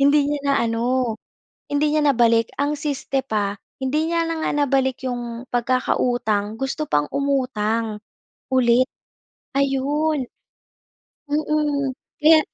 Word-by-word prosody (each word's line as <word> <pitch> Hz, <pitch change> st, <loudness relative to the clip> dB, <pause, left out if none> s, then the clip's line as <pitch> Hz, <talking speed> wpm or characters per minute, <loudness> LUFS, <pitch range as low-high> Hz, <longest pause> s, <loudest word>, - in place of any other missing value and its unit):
Hindi 285 Hz, +1 st, +4 dB
niya 295 Hz, -1 st, -1 dB
na 275 Hz, -, +3 dB
ano, 235 Hz, 0 st, 0 dB, 0.5 s
hindi 295 Hz, +1 st, +2 dB
niya 310 Hz, -, +3 dB
nabalik. 230 Hz, -4 st, +4 dB
Ang 290 Hz, +1 st, +1 dB
siste 275 Hz, -2 st, -1 dB
pa, 205 Hz, -4 st, -1 dB, 0.3 s
hindi 300 Hz, +5 st, 0 dB
niya 335 Hz, 0 st, +1 dB
na 330 Hz, -1 st, -2 dB
nga -, -, +1 dB
nabalik 265 Hz, -1 st, 0 dB
yung 240 Hz, -1 st, -4 dB
pagkakautang, 240 Hz, -3 st, 0 dB
gusto 270 Hz, +3 st, -2 dB
pang 150 Hz, 0 st, +2 dB
umutang, 230 Hz, -6 st, 0 dB, 0.5 s
ulit. 255 Hz, 0 st, +4 dB, 0.7 s
Ayun. 280 Hz, +1 st, +1 dB, 1.0 s
Mm. 295 Hz, -2 st, 0 dB, 0.3 s
Kaya 315 Hz, +1 st, +8 dB
265 Hz, 115 wpm, -22 LUFS, 235-290 Hz, 1.0 s, Kaya